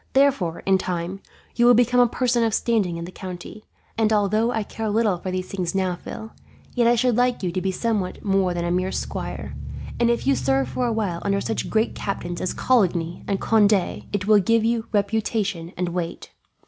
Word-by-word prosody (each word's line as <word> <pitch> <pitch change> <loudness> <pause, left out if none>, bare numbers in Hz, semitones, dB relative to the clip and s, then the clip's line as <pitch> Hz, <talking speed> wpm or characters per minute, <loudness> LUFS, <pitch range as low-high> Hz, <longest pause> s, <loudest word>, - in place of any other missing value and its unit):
Therefore, 265 -12 +2
in 190 -1 +3
time, 180 +1 -3 0.3
you 240 0 +4
will 245 - +7
become 245 +1 +3
a 245 - +6
person 240 0 +1
of 225 -1 +1
standing 205 -8 +1
in 170 - -5
the 180 - -9
county; 185 +3 -8 0.3
and 220 -1 +3
although 215 +2 +2
I 220 -3 -1
care 220 +1 -4
little 210 -4 +1
for 185 - -5
these 185 0 -3
things 185 -2 -3
now, 185 -2 +1
Phil, 220 +5 -8 0.4
yet 240 -2 +3
I 240 - +5
should 245 0 +2
like 245 -2 +1
you 180 - 0
to 185 +1 -2
be 190 +1 0
somewhat 205 -2 -2
more 195 -2 +2
than 170 0 -2
a 175 - -1
mere 185 +1 0
squire; - - -5 0.4
and 235 0 +3
if 235 - 0
you 140 - +4
serve 135 +1 +1
for 250 - -1
a - - 0
while 200 -7 -2
under 200 0 +1
such 225 - -3
great 220 +1 +1
captains 175 -3 -4
as 185 - -1
Coligny 175 -9 +1
and 195 -1 0
Conde, 215 -2 +4 0.4
it 205 -2 -2
will 210 0 +6
give 230 +3 +2
you 230 -1 0
reputation 200 -4 -1
and 180 0 -1
weight. 175 -1 -4
200 Hz, 210 wpm, -23 LUFS, 180-230 Hz, 0.4 s, will